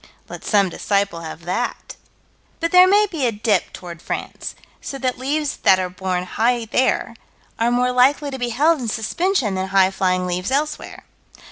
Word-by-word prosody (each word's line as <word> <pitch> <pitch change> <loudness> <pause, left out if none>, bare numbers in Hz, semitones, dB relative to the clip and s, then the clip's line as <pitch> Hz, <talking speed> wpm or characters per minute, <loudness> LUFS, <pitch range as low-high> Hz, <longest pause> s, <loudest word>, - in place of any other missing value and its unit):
Let - - -9
some 200 -3 +2
disciple 200 -1 -1
have 160 +1 -8
that. 210 +8 -3 0.6
But 335 -1 -1
there 365 0 +8
may 410 +2 +5
be 320 -10 -1
a - - +1
dip 210 -3 0
toward 170 -2 -9
France, - - -5 0.3
so 275 - -6
that 255 -1 -2
leaves 290 +3 -1
that 190 - +5
are 185 -1 -3
borne 185 -1 -2
high 230 +5 0
there, 250 +4 0 0.4
are 230 +1 +2
more 250 +1 +2
likely 280 +3 +3
to 265 - -6
be 245 -1 -1
held 300 +7 +2
in 245 - -4
suspension 245 - 0
than 190 0 -2
highflying 185 -1 +2
leaves 180 +2 -2
elsewhere. 295 +3 -3
235 Hz, 170 wpm, -21 LUFS, 190-275 Hz, 0.6 s, there